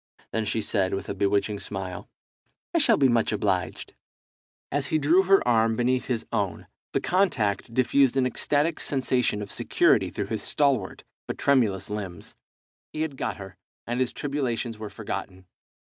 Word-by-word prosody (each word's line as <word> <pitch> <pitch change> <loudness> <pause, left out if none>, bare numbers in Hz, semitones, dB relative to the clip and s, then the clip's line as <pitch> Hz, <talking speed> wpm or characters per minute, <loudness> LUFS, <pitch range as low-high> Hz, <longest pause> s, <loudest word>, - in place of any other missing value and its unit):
Then 110 -1 -1
she 110 +2 0
said, 95 -3 0
with 95 - -6
a - - -1
bewitching 100 +1 0
smile 95 -3 -6 0.6
"I - - +3
shall - - +4
be 140 - +5
much 120 -2 +2
obliged." 95 -6 -1 0.8
As 140 0 -1
he 155 - +1
drew 155 +5 +4
her 195 -6 +3
arm 115 -1 +3
beneath 125 +2 +1
his 120 -3 -2
own - - -1 0.3
the - - +1
contact 120 - +1
diffused 130 +1 +3
an 130 - +3
ecstatic 145 +5 0
sensation 125 -6 0
of 100 - -8
security - - +2
through - - -3
his - - -3
stalwart 135 -10 0 0.2
but - - -4
tremulous 115 -9 +2
limbs. 95 -5 -5 0.6
He 155 - -2
had 155 -4 -4
got 110 -5 -3
her, 95 -2 -10 0.3
and 120 +1 -2
his 130 -1 +1
tribulations 125 -5 -3
were 110 -1 -6
forgotten. 95 -1 -6
115 Hz, 160 wpm, -26 LUFS, 100-140 Hz, 0.8 s, be